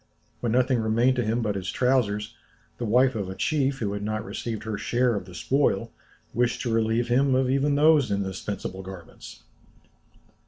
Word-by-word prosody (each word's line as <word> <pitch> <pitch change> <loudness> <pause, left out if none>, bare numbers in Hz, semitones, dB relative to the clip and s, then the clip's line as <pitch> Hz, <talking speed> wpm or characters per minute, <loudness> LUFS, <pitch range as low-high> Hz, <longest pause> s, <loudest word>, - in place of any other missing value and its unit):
When 120 - -1
nothing 125 +1 +2
remained 115 +4 +2
to 120 - +1
him 115 +2 0
but 105 -2 0
his 95 -2 -4
trousers, 110 -5 0 0.5
the 120 - -2
wife 125 +4 +4
of 100 -5 -3
a 95 - -6
chief, 140 +2 0
who 105 -5 -2
had 100 - -4
not 110 +1 -3
received 115 -3 -5
her 110 -1 -3
share 120 +4 +1
of 100 -4 -3
the 90 -1 -12
spoil, 115 0 0 0.4
wished 120 +1 0
to 120 - -1
relieve 115 +1 +1
him 130 +2 +3
even 140 +3 +1
of - - +2
those 155 -4 +5
indispensable 100 -1 -3
garments! 95 -3 -11
115 Hz, 175 wpm, -26 LUFS, 105-130 Hz, 0.5 s, those